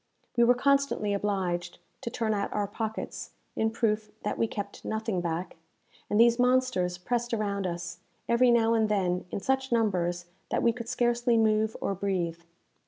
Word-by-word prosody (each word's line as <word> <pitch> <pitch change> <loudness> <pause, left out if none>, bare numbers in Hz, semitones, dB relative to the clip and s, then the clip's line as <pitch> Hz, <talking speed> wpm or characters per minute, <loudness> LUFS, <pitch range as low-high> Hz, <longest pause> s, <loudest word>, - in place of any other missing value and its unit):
We 235 - +5
were 245 +1 +5
constantly 275 -5 +2
obliged 185 -4 -1 0.2
to - - -3
turn 225 -1 -1
out 200 -1 -1
our 205 -1 0
pockets, 220 +2 -5 0.2
in 220 - +1
proof 220 -2 0
that - - -1
we 225 - +3
kept 205 -2 -6
nothing 220 -4 -2
back; 170 +1 -3 0.5
and 210 - +2
these 235 +1 +6
monsters 250 -8 +2
pressed 240 +5 -1
around 200 -3 -1
us, 175 0 -5 0.3
every 240 +1 +4
now 230 -1 +4
and 220 -1 +2
then, 180 -3 0
in 195 - -4
such 265 +2 0
numbers 180 -6 +1 0.2
that - - 0
we 235 - +4
could 235 -1 -7
scarcely 240 0 +2
move 220 0 +2
or - - 0
breathe. 180 -4 -2
215 Hz, 170 wpm, -28 LUFS, 185-235 Hz, 0.5 s, these